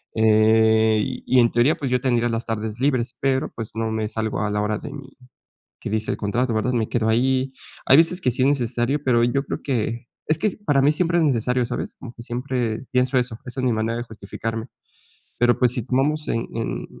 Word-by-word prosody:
eh, 110 Hz, 0 st, +4 dB
y 130 Hz, -, 0 dB
en 120 Hz, -1 st, +4 dB
teoría, 120 Hz, +6 st, +3 dB
pues, 135 Hz, -3 st, -3 dB
yo 125 Hz, -, +2 dB
tendría 120 Hz, -2 st, +1 dB
las 115 Hz, +1 st, -2 dB
tardes 110 Hz, 0 st, -4 dB
libres, 130 Hz, -3 st, 0 dB
pero, 135 Hz, -1 st, 0 dB
pues, 115 Hz, -2 st, -6 dB
no 110 Hz, 0 st, -1 dB
me 110 Hz, -1 st, -1 dB
salgo 110 Hz, 0 st, -3 dB
a 105 Hz, -, 0 dB
la 105 Hz, 0 st, -1 dB
hora 105 Hz, 0 st, -1 dB
de -, -, -8 dB
mi 140 Hz, -2 st, -9 dB, 0.7 s
que -, -, -6 dB
dice 110 Hz, +1 st, -1 dB
el -, -, -3 dB
contrato, 115 Hz, +4 st, -1 dB
¿verdad?, 110 Hz, +3 st, 0 dB
me 115 Hz, -2 st, 0 dB
quedo 110 Hz, -2 st, 0 dB
ahí. 130 Hz, +3 st, +1 dB, 0.3 s
Hay 135 Hz, -, +6 dB
veces 175 Hz, +3 st, +3 dB
que 125 Hz, -, +2 dB
sí 130 Hz, -, -3 dB
es 130 Hz, -, +4 dB
necesario, 130 Hz, +1 st, 0 dB
pero, 120 Hz, -3 st, +3 dB
yo 135 Hz, +3 st, 0 dB
creo -, -, -4 dB
que, 120 Hz, -2 st, -2 dB, 0.2 s
es 155 Hz, -, +2 dB
que, 215 Hz, -, +1 dB, 0.2 s
para 140 Hz, -3 st, +3 dB
mí 145 Hz, +2 st, +4 dB
siempre 175 Hz, +1 st, +1 dB
es 165 Hz, -, +3 dB
necesario, 125 Hz, -2 st, +1 dB
¿sabes?, 125 Hz, -, -5 dB
como 120 Hz, -3 st, -10 dB
que 115 Hz, -, -11 dB
siempre 120 Hz, -1 st, -3 dB
pienso 125 Hz, +1 st, +2 dB
eso. 120 Hz, -3 st, -1 dB
Esa 125 Hz, +1 st, -6 dB
es 130 Hz, -, 0 dB
mi 125 Hz, -, +2 dB
manera 110 Hz, +2 st, -1 dB
de 120 Hz, -, -3 dB
justificarme, 115 Hz, +1 st, -6 dB, 0.7 s
pero 120 Hz, 0 st, +3 dB
pues, 125 Hz, -2 st, +3 dB
si 125 Hz, -, -2 dB
tomamos 150 Hz, +5 st, 0 dB
en 115 Hz, -, -1 dB
en, 115 Hz, -1 st, -3 dB
120 Hz, 220 wpm, -22 LUFS, 110-130 Hz, 0.7 s, Hay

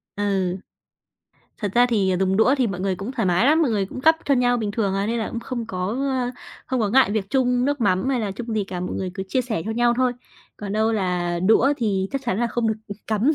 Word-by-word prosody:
Ừ. 195 Hz, -3 st, 0 dB, 1.0 s
Thật 205 Hz, -, -2 dB
ra 245 Hz, +1 st, +5 dB
thì 200 Hz, -6 st, +1 dB
dùng 190 Hz, 0 st, +2 dB
đũa 240 Hz, +6 st, +4 dB
thì 250 Hz, -, +3 dB
mọi 185 Hz, -3 st, -4 dB
người 190 Hz, -1 st, -1 dB
cũng 205 Hz, +8 st, -5 dB
thoải 225 Hz, -7 st, -1 dB
mái 180 Hz, +8 st, +3 dB
lắm, 315 Hz, +3 st, +4 dB
mọi 265 Hz, -, +2 dB
người 200 Hz, -3 st, 0 dB
cũng 255 Hz, -, -8 dB
gắp 320 Hz, +4 st, +5 dB
cho 280 Hz, -, +3 dB
nhau 245 Hz, -1 st, +2 dB
bình 215 Hz, -3 st, -2 dB
thường 200 Hz, -3 st, -1 dB
à, 195 Hz, +1 st, 0 dB
nên 235 Hz, +1 st, -1 dB
là 220 Hz, -, -2 dB
cũng 235 Hz, -, -4 dB
không 235 Hz, -2 st, -5 dB
có, 185 Hz, -4 st, -3 dB
ơ, 255 Hz, +1 st, -1 dB, 0.4 s
không 255 Hz, -2 st, -1 dB
có 210 Hz, -, +1 dB
ngại 260 Hz, -4 st, +4 dB
việc 205 Hz, -2 st, -2 dB
chung 250 Hz, -2 st, +2 dB
nước 285 Hz, -1 st, 0 dB
mắm 195 Hz, +4 st, +1 dB
hay 255 Hz, -3 st, +1 dB
là 205 Hz, -2 st, -2 dB
chung 225 Hz, +2 st, -5 dB
gì 210 Hz, -, 0 dB
cả, 180 Hz, -2 st, -6 dB
mọi 180 Hz, -, -4 dB
người 185 Hz, -1 st, -3 dB
cứ 190 Hz, -, -4 dB
chia 255 Hz, -, +1 dB
sẻ 220 Hz, -9 st, -3 dB
cho 220 Hz, -, -3 dB
nhau 240 Hz, +1 st, +2 dB
thôi. 255 Hz, -1 st, +2 dB, 0.4 s
Còn 205 Hz, -1 st, -6 dB
đâu 220 Hz, +1 st, +1 dB
là 180 Hz, -4 st, -1 dB
đũa 260 Hz, +6 st, +5 dB
thì 195 Hz, -5 st, 0 dB
chắc 275 Hz, -, -2 dB
chắn 205 Hz, -3 st, -1 dB
là 240 Hz, -, +2 dB
không 235 Hz, -1 st, -1 dB
được, 220 Hz, -, +1 dB
ừm, 205 Hz, -, -6 dB
cắm 220 Hz, +6 st, +2 dB
220 Hz, 270 wpm, -23 LUFS, 195-245 Hz, 1.0 s, ra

